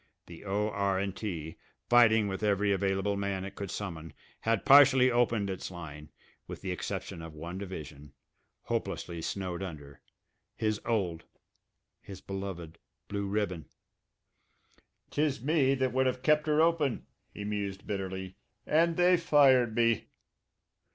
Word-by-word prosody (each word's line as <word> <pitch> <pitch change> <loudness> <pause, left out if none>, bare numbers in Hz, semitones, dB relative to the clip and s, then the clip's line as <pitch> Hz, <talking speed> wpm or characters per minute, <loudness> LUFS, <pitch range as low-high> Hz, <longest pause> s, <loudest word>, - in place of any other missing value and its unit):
The 85 -1 -12
O.R.& 100 -1 0
T., 85 -6 -6 0.3
fighting 110 -3 +5
with 95 0 -4
every 105 -1 +2
available 95 +1 0
man 100 -1 -2
it 95 - -7
could 100 -2 -6
summon, 85 -6 -6 0.3
had 115 -2 0
partially 135 -2 +7
opened 120 -4 +2
its 95 -2 -4
line, 75 -4 -9 0.4
with - - -8
the 95 - -3
exception 90 -2 -5
of 80 -1 -9
one 85 +4 -6
division, 75 -7 -8 0.5
hopelessly 85 -1 -3
snowed 90 +1 -4
under 75 -7 -8 0.5
his 110 -1 -1
old, 90 -8 -1 0.8
his 95 - -10
beloved 95 -4 -6 0.3
Blue 100 -1 -2
Ribbon. 100 -6 -2 1.5
"Tis 145 -3 0
me 135 0 +2
that 130 -2 0
would 130 0 +2
have 125 0 -2
kept 150 0 +3
'er 155 +1 +4
open," 165 -6 +1 0.3
he 105 - -7
mused 100 -2 -4
bitterly. 95 -1 -5 0.3
"And 165 +1 +2
they 180 0 +5
fired 135 -8 +4
me!" 115 -2 +2
100 Hz, 130 wpm, -30 LUFS, 95-125 Hz, 1.5 s, partially